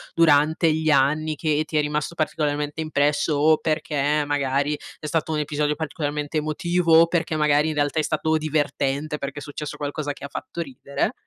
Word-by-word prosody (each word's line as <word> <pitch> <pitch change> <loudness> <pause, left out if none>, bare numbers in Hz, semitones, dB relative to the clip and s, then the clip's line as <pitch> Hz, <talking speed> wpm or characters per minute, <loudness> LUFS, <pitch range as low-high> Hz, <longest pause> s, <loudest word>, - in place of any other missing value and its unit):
durante 160 0 +4
gli 160 0 0
anni, 155 +2 +2
che 155 0 0
ti 155 - -2
è - - +4
rimasto 150 +2 -2
particolarmente 150 -1 -1
impresso, 155 +2 +1
o 155 +2 +4
perché 150 -1 0
magari 145 0 0 0.3
è - - -4
stato 160 +1 -1
un 155 - 0
episodio 150 0 -1
particolarmente 150 -1 -3
emotivo, 165 +2 +1
o 165 +1 +7
perché 165 -2 -1
magari 150 0 +3
in - - -2
realtà 145 +1 0
è - - +4
stato 155 +1 0
divertente, 150 -1 -1
perché 140 0 -5
è - - -10
successo 145 +1 -6
qualcosa 145 0 -3
che - - -15
ha 140 - -5
fatto 170 - -6
ridere? 140 -1 -3
150 Hz, 180 wpm, -23 LUFS, 145-155 Hz, 0.3 s, o